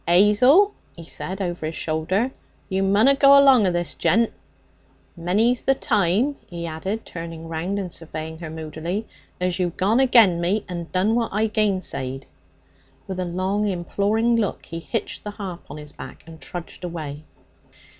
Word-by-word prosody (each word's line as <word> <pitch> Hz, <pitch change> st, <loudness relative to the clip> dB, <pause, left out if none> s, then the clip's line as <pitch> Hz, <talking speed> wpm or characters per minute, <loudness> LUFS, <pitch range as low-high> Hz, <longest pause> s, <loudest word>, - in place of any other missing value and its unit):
''Azel,' 210 Hz, -, +6 dB, 0.2 s
he 170 Hz, -, -10 dB
said 190 Hz, +3 st, -5 dB
over 175 Hz, -4 st, -3 dB
his 160 Hz, -, -5 dB
shoulder, 175 Hz, +10 st, -1 dB, 0.4 s
'you 190 Hz, 0 st, 0 dB
munna 205 Hz, +8 st, +4 dB
go 275 Hz, 0 st, +7 dB
along 265 Hz, -7 st, +6 dB
of 180 Hz, -, +1 dB
this 175 Hz, 0 st, -2 dB
gent. 230 Hz, +3 st, +2 dB, 0.8 s
Many's 210 Hz, +8 st, +1 dB
the 270 Hz, -, +2 dB
time,' 215 Hz, +6 st, +1 dB
he 170 Hz, -1 st, -6 dB
added 190 Hz, +7 st, -4 dB
turning 165 Hz, -1 st, -7 dB
round 165 Hz, +5 st, -3 dB
and 185 Hz, -4 st, -4 dB
surveying 160 Hz, -1 st, -7 dB
her 165 Hz, -2 st, -6 dB
moodily, 160 Hz, +6 st, -4 dB, 0.3 s
'as 180 Hz, 0 st, -1 dB
you've 175 Hz, -2 st, -1 dB
gone 210 Hz, +6 st, +2 dB
agen 225 Hz, -10 st, +5 dB
me 195 Hz, +5 st, 0 dB
and 175 Hz, -2 st, -6 dB
done 190 Hz, +4 st, +2 dB
what 230 Hz, -1 st, +1 dB
I 215 Hz, +2 st, +1 dB
gainsayed.' 185 Hz, -, -1 dB, 0.8 s
With 190 Hz, -1 st, -5 dB
a 185 Hz, -, -1 dB
long 190 Hz, +4 st, -1 dB
imploring 205 Hz, +5 st, +1 dB
look 210 Hz, -4 st, -2 dB
he 165 Hz, -, -6 dB
hitched 225 Hz, +6 st, -4 dB
the 210 Hz, -, -5 dB
harp 195 Hz, -4 st, -7 dB
on 150 Hz, -, -7 dB
his 150 Hz, -1 st, -10 dB
back -, -, -10 dB
and 160 Hz, -1 st, -13 dB
trudged 175 Hz, +1 st, -8 dB
away. 155 Hz, -4 st, -5 dB
185 Hz, 165 wpm, -23 LUFS, 170-215 Hz, 0.8 s, go